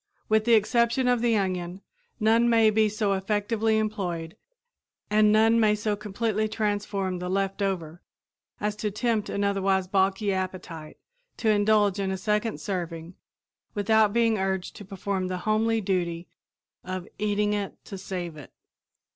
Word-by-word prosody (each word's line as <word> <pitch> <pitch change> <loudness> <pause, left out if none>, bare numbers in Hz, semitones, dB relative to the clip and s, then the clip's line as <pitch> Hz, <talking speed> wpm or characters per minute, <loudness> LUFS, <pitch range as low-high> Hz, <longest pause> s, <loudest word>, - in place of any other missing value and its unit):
With 215 0 +3
the 235 -1 +6
exception 235 +3 +2
of 245 -2 +2
the 235 -2 +2
onion, 185 -1 -2 0.4
none 230 +2 +4
may 225 -2 +5
be 215 0 +3
so 210 -1 0
effectively 210 +3 0
employed 180 -7 -3 0.8
and 210 0 +5
none 225 +2 +4
may 215 -2 +4
so 210 0 -1
completely 215 +1 -1
transform 205 -3 -2
the 180 0 -4
"left 195 +1 -1
over" 175 -4 -2 0.6
as 210 0 -1
to 210 - -1
tempt 215 0 -1
an 200 - -1
otherwise 195 -2 +1
balky 195 +1 +1
appetite 185 -4 -5 0.4
to 225 - 0
indulge 205 -1 +3
in 195 -1 -1
a 190 - -2
second 210 -2 -1
serving 170 -1 -5 0.6
without 215 0 +3
being 225 -1 +2
urged 190 -1 -2
to 205 - -10
perform 195 0 -3
the 185 0 -3
homely 225 +1 +2
duty 175 -3 -2 0.6
of 185 -1 -5
"eating 210 0 +1
it 205 -1 -3
to 200 - -8
save 180 -4 -5
it." 145 - -12
205 Hz, 150 wpm, -26 LUFS, 190-215 Hz, 0.8 s, the